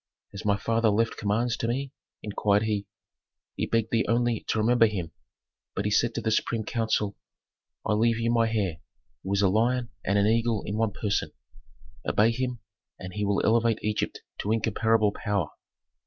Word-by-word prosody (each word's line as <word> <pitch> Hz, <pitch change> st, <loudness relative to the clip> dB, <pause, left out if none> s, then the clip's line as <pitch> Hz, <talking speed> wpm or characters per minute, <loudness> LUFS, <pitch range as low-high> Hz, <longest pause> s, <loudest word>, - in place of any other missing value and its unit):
"Has 100 Hz, -, -8 dB
my 100 Hz, -1 st, +2 dB
father 115 Hz, +2 st, +1 dB
left 115 Hz, +2 st, +1 dB
commands 115 Hz, +3 st, 0 dB
to 115 Hz, -, -2 dB
me?" 135 Hz, +3 st, -2 dB, 0.3 s
inquired 105 Hz, 0 st, +1 dB
he. 105 Hz, -2 st, -1 dB, 0.7 s
"He -, -, -2 dB
begged 115 Hz, -1 st, 0 dB
thee 115 Hz, -1 st, +3 dB
only 120 Hz, -1 st, +2 dB
to -, -, 0 dB
remember 115 Hz, +1 st, +4 dB
him, 90 Hz, -6 st, -4 dB, 0.6 s
but 100 Hz, -, -2 dB
he 105 Hz, -, 0 dB
said 115 Hz, +2 st, +2 dB
to -, -, -1 dB
the 110 Hz, 0 st, 0 dB
supreme 110 Hz, +1 st, 0 dB
council, 110 Hz, -3 st, -1 dB, 0.7 s
'I 110 Hz, -, +1 dB
leave 115 Hz, +2 st, +2 dB
you 115 Hz, 0 st, 0 dB
my 115 Hz, -1 st, +2 dB
heir, 100 Hz, -7 st, 0 dB, 0.4 s
who 95 Hz, -, -5 dB
is 100 Hz, 0 st, +2 dB
a -, -, +6 dB
lion 120 Hz, +5 st, +1 dB
and 100 Hz, +2 st, +1 dB
an 100 Hz, -, +3 dB
eagle 115 Hz, 0 st, +2 dB
in 100 Hz, -, -3 dB
one 110 Hz, -1 st, +1 dB
person; 105 Hz, -1 st, -1 dB, 0.7 s
obey 110 Hz, +3 st, +3 dB
him, 125 Hz, 0 st, -3 dB, 0.4 s
and 90 Hz, 0 st, -8 dB
he 105 Hz, -, -2 dB
will 100 Hz, -1 st, +1 dB
elevate 115 Hz, 0 st, +3 dB
Egypt 105 Hz, 0 st, -2 dB, 0.2 s
to 105 Hz, -, -1 dB
incomparable 110 Hz, -1 st, +2 dB
power.'" 100 Hz, -6 st, -2 dB
110 Hz, 180 wpm, -27 LUFS, 105-115 Hz, 0.7 s, a